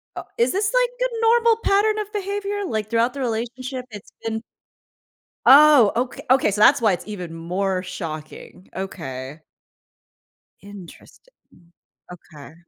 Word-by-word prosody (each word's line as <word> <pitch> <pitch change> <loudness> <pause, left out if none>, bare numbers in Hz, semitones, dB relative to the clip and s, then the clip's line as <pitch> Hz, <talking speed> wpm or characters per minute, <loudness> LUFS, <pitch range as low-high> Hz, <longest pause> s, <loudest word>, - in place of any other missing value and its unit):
Uh - - -6
is 470 - +2
this 400 +2 0
like - - 0
a 460 - -5
normal 460 0 +4
pattern 425 +2 +2
of 420 -1 -5
behavior? 405 0 -3
Like, 215 - -3
throughout 230 +2 +1
the 280 - -8
relationship, 250 +2 -4
it's 205 -2 -11
been 225 0 -3 1.1
Oh, 280 -5 +7
oka 260 +3 -3
okay, 260 -3 +4
so, 205 - -3
that's 270 +4 +6
why 215 -4 +3
it's 180 +2 -6
even 180 -6 -7
more 185 +3 -2
shocking. 165 -1 -8
Okay. 150 -6 -7 1.2
Interesting. 200 - -14 0.8
Okay. 155 -4 -13
235 Hz, 135 wpm, -22 LUFS, -, 1.2 s, Oh